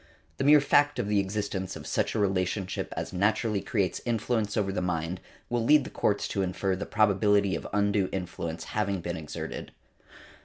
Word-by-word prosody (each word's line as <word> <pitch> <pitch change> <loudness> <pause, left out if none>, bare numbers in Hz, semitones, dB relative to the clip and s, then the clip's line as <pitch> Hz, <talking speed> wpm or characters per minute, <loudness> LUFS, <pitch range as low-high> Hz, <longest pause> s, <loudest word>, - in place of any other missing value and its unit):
The - - -1
mere 145 +1 +7
fact 145 0 +3
of 120 -4 -1
the 105 -1 +2
existence 100 -1 -2
of - - -9
such - - -1
a - - +1
relationship 95 -1 -1
as - - -4
naturally 105 +2 +1
creates 100 -3 -1
influence 115 -2 -1
over 100 -2 +1
the 95 - -2
mind 90 0 -2 0.3
will 120 -1 0
lead 150 +4 +5
the - - -8
courts 100 -1 0
to 100 - -1
infer 95 +1 -1
the 95 - -5
probability 100 -2 +3
of - - -5
undue 100 -1 +1
influence 85 -3 -4
having 100 -3 0
been 85 +1 -3
exerted. 80 -3 -6
100 Hz, 180 wpm, -28 LUFS, 95-110 Hz, 0.3 s, mere